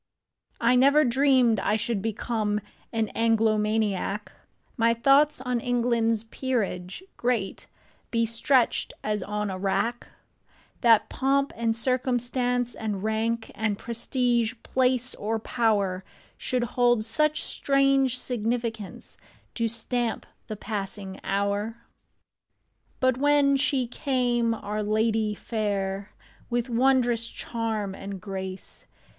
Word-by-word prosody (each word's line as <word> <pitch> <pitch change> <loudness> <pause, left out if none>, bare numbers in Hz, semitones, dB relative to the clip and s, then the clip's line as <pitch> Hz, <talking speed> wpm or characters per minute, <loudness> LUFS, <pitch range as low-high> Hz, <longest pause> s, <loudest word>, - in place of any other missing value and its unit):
NEVER 260 +5 +5
dreamed 255 -3 +4
I 210 - +1
should 220 -1 -1
become 215 -1 -1 0.3
An 225 -2 0
Anglomaniac; 215 -2 +1 0.4
My 230 -1 +3
thoughts 275 +5 +4
on 250 -2 -1
England's 235 -2 +1
peerage 225 - -3
great 235 -5 -1 0.4
Be 230 -1 +1
stretched 230 +2 +1
as 210 -1 -1
on 210 +1 -3
a 185 - -5
rack; 200 +5 -1 0.7
That 230 -2 +5
pomp 275 +1 +1
and 230 -1 0
circumstance 245 0 0
and 210 -3 -4
rank 225 +1 -1
And 215 -2 -1
prestige, 235 0 0
place 255 -1 +1
or 220 +2 -2
power, 205 -5 0 0.3
Should 250 -1 -1
hold 240 -2 +2
such 305 +6 +1
strange 275 -2 +2
significance 230 -3 -3 0.3
To 230 -1 0
stamp 235 +1 -2 0.2
the 215 - -5
passing 195 -2 -5
hour. 200 +3 -1 1.2
But 255 -1 +2
when 285 -1 +4
she 270 -2 +1
came, 245 -3 0
our 210 0 -4
Ladye 215 0 +1
Faire, 200 -3 -2 0.4
With 240 0 -1
wondrous 240 -2 +2
charm 220 -5 -3
and 195 0 -7
grace. 190 -1 -7
230 Hz, 105 wpm, -26 LUFS, 210-250 Hz, 1.2 s, NEVER